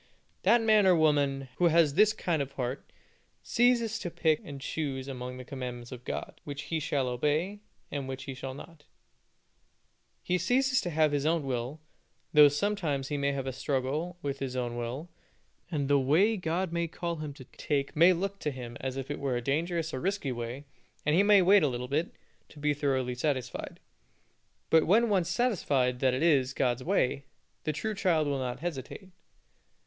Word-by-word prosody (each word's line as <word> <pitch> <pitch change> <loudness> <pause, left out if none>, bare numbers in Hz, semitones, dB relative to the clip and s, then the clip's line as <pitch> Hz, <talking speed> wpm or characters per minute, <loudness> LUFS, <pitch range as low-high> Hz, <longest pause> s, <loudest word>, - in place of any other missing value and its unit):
That 235 0 +4
man 215 -3 +5
or 185 - +6
woman 145 -4 +2
who 180 - +3
has 165 -3 +4
this 210 +6 +5
kind 170 -7 -1
of 140 0 -5
a - - -28
heart, 125 +1 -4 0.5
ceases 235 -2 +2
to 175 - -4
pick 160 0 +1
and 145 -7 -8
choose 135 -2 -3
amongst 125 -1 -6
the 130 - -9
commandments 125 -2 -6
of 125 -1 -9
God, - - -5
which 145 -1 -6
he 160 - -2
shall 140 -3 -1
obey, 150 +11 0 0.3
and 140 -2 -3
which 130 0 -5
he 135 - -6
shall 130 0 -6
not 150 +1 -12 1.4
he 180 0 0
ceases 255 +7 +2
to 175 - -3
have 155 -2 +2
his 145 +1 0
own 165 -1 +1
will, 130 +2 -3 0.5
though 150 -1 +9
sometimes 145 -3 -1
he 145 - -1
may 140 0 +1
have 135 -1 -3
a 130 - -3
struggle 140 +6 -2
with 140 -1 -3
his 130 -2 -4
own 120 -2 -2
will, 120 +7 -4 0.6
and 145 -5 -1
the 140 0 +4
way 165 +12 +3
that 195 - -7
God 170 +1 -1
may 170 0 0
call 170 +1 -4
him 155 -1 -5
to 135 - -11
take 140 +1 -2
may 170 +4 +7
look 195 +3 -2
to 150 - -1
him 125 -4 -7
as 130 0 -3
if 135 +1 -4
it 145 - -4
were 135 -3 -1
a - - 0
dangerous 165 +4 -1
or 130 - -2
risky 190 -4 -1
way, 120 +3 -5 0.4
and 150 - +2
he 185 - +5
may 205 -2 +6
wait 195 +3 +6
a 150 - +3
little 125 -1 -3
bit, 150 +6 -1 0.4
to - - -17
be 150 0 +1
thoroughly 135 -3 0
satisfied; 130 0 -3 0.9
but 160 -1 +5
when 225 +6 +4
once 185 -4 +1
satisfied 145 - +1
that 130 -1 +2
it 135 - -1
is 135 -6 +3
God's 125 -1 0
way, 140 -6 0 0.4
the 155 - +1
true 155 +9 -3
child 175 -6 +2
will 140 -1 -1
not 125 +1 -4
hesitate. 175 - -6
145 Hz, 195 wpm, -29 LUFS, 130-175 Hz, 1.4 s, though